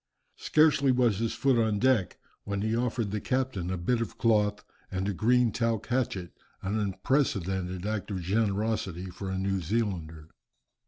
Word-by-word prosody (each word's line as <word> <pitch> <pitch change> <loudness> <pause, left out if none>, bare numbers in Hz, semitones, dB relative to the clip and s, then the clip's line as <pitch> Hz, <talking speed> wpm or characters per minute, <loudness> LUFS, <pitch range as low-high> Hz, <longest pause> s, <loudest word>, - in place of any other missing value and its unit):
Scarcely 150 -3 +4
was 120 -5 +2
his 115 0 -1
foot 135 -3 +2
on 110 -2 +2
deck, 120 -5 +2 0.3
when 100 0 -3
he 110 +1 0
offered 115 -3 -1
the 105 0 -2
captain 130 -9 -1
a 95 - -1
bit 115 +7 0
of 115 - -4
cloth, 105 -3 +2 0.3
and 95 +1 -2
a 100 - 0
green 120 +4 +3
talc 115 -1 -1
hatchet, 115 -8 -1 0.3
an 100 +3 -1
unprecedented 95 - -1
act 105 -1 -2
of 100 -3 -3
generosity 100 -2 -1
for 95 +2 -6
a 95 - -2
New 95 0 -1
Zealander. 85 -5 -2
105 Hz, 160 wpm, -28 LUFS, 95-115 Hz, 0.3 s, Scarcely